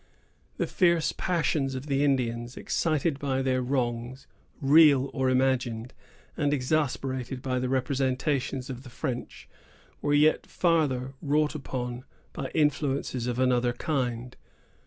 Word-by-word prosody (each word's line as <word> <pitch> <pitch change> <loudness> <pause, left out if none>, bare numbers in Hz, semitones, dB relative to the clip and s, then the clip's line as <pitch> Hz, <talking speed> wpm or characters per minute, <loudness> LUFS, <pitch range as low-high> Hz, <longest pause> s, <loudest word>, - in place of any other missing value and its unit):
The - - 0
fierce 170 -3 +2
passions 150 -6 0
of 130 +2 -5
the 140 -1 +1
Indians, 120 -3 0
excited 155 -2 0
by 135 -2 -1
their 130 -1 +1
wrongs, 125 0 -2 0.3
real 140 -2 +5
or 130 -1 +1
imagined, 125 -3 0 0.4
and 145 -1 +1
exasperated 130 -2 -1
by 130 -1 -1
the 125 0 -2
representations 130 0 -1
of 125 -1 -7
the 130 - -12
French, 125 0 -5 0.5
were 145 - +2
yet 150 +2 +3
farther 145 -7 +1
wrought 150 0 +1
upon 125 -4 -5 0.3
by - - -4
influences 140 -5 0
of 120 -1 -2
another 125 -1 +2
kind. 125 -3 -2
130 Hz, 125 wpm, -27 LUFS, 125-145 Hz, 0.5 s, real